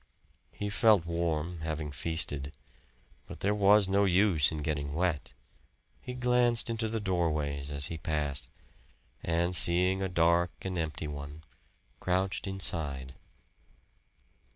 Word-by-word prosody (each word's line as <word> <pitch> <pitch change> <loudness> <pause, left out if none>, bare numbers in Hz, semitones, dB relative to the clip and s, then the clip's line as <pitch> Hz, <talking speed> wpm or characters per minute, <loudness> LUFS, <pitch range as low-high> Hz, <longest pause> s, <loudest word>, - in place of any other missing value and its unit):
He 105 - -5
felt 105 -4 +4
warm, 85 0 -2
having 80 -2 -4
feasted. 75 -2 -3 0.7
But - - -10
there 100 +2 +2
was 105 0 +5
no 100 +1 +3
use 95 -5 +4
in 75 -1 -4
getting 70 -1 -3
wet. 85 -7 -1 0.7
He 125 - -7
glanced 125 -1 +2
into 115 0 -1
the 115 +1 -2
doorways 75 -7 -1
as 70 0 0
he 80 0 -4
passed, 75 -4 -2 0.7
and 85 +2 0
seeing 90 +3 +5
a 95 - -1
dark 85 0 +3
and 95 -1 -3
empty 80 -1 -3
one, 75 +1 -8 0.6
crouched 95 +2 -1
inside. 75 -9 -3
85 Hz, 125 wpm, -30 LUFS, 75-95 Hz, 0.7 s, was